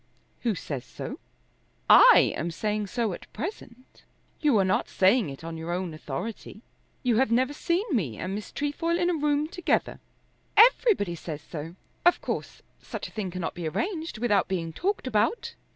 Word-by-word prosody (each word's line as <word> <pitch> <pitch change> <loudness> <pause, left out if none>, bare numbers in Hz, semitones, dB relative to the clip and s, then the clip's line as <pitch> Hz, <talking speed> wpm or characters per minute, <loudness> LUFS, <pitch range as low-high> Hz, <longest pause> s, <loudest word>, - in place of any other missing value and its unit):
"Who 230 -4 0
says 140 -7 -5
so?" - - -7 0.7
"I - - +8
am 165 - -2
saying 210 +4 -2
so 225 -1 -1
at - - -11
present." 255 - -8 0.4
"You 290 -7 +3
are 195 - +3
not 185 - 0
saying 195 - +3
it 135 +3 -9
on 165 0 -6
your 165 +1 -5
own 180 -1 -2
authority. 185 - -6 0.4
You 240 -4 +2
have 265 -1 +2
never 255 +4 +2
seen 345 +6 0
me 155 - -1
and 185 +2 -4
Miss 210 +1 -6
Trefoil 330 +4 -1
in 350 0 +2
a - - 0
room 295 0 +1
together." 360 0 -1 0.6
"Everybody 440 - +5
says 155 -3 -7
so. 160 +1 -7 0.3
Of 350 - +5
course - - -5 0.2
such - - -6
a - - -20
thing 210 -4 -4
cannot 180 -2 -4
be 175 -2 -4
arranged 330 - -3
without 210 -4 +2
being 170 -4 -3
talked 395 - -1
about." 230 - 0
215 Hz, 170 wpm, -27 LUFS, -, 0.7 s, I